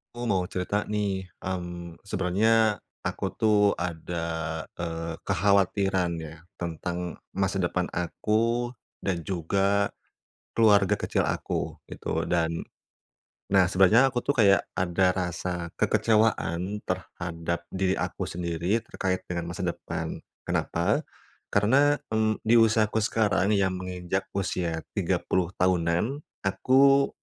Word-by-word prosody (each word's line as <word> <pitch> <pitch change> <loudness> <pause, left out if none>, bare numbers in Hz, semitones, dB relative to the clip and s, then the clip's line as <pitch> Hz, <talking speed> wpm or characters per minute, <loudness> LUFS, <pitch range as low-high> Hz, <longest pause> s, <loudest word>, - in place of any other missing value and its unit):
Ku 120 - -5
mau 90 -2 +1
cerita 100 +3 -2
nih, 100 -3 -1 0.2
mmm, 85 -2 -5
sebenarnya 105 +3 +2 0.2
aku - - -2
tuh 105 -2 +3
ada, 80 -1 -3 0.2
eee, 85 -1 -3
kekhawatiran 95 -1 +2
ya 80 +1 -10 0.2
tentang 85 +1 -4 0.2
masa 95 0 0
depan 90 0 0
aku 115 +7 0 0.3
dan 95 -3 0
juga 100 +3 +1 0.7
keluarga 100 -4 +5
kecil - - 0
aku - - -2
gitu. 80 0 -3
Dan 85 -1 0 0.9
nah 95 -1 +6
sebenarnya 95 +8 +5
aku 120 - 0
tuh 140 - 0
kayak 100 -3 +5
ada 95 +1 +2
rasa 90 -2 -3
kekecewaan 105 -3 +1
terhadap 85 0 -4
diri 95 0 +1
aku - - -3
sendiri 85 +4 -1
terkait 95 -1 -2
dengan 85 -1 -3
masa 95 +3 -5
depan. 85 - -4 0.3
Kenapa? - - +1 0.5
Karena, 135 +8 +4 0.2
mmm, 110 0 +1
di 110 +1 +4
usiaku 110 -1 +3
sekarang 105 -3 +2
yang 95 -1 +2
menginjak 90 +1 -3
usia 85 -4 -2
30 90 -2 0
tahunan, 90 - +1 0.2
aku 135 +7 +4
95 Hz, 110 wpm, -27 LUFS, 85-105 Hz, 0.9 s, nah